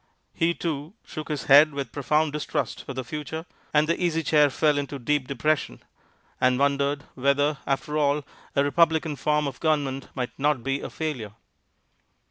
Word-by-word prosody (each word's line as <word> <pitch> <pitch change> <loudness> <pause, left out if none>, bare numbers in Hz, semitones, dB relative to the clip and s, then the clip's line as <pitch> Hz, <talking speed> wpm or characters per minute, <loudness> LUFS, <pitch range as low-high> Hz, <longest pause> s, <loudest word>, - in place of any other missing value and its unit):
He, 170 +1 +1
too, 155 +2 -4
shook 155 - -7
his 150 -3 -2
head 145 +2 +7
with 140 -1 -4
profound 150 +2 +1
distrust 150 - -3
of 135 - -5
the 130 - -3
future; 150 +5 -5 0.3
and 150 0 +3
the 170 +2 0
Easy 165 -2 +1
Chair 150 -1 +4
fell 150 +1 +2
into 140 0 -4
deep 140 +1 0
depression, 140 - -1 0.6
and 125 0 +3
wondered 140 +1 +1
whether, 140 +2 +1
after 150 +2 -1
all, 145 -1 +1 0.3
a 140 - +4
republican 160 +1 +2
form 150 +2 +1
of 140 - -5
government 145 -4 0
might 125 -2 -2
not 145 -3 +1
be 135 +1 -1
a - - -5
failure. 130 -10 -4
145 Hz, 165 wpm, -25 LUFS, 140-155 Hz, 0.6 s, head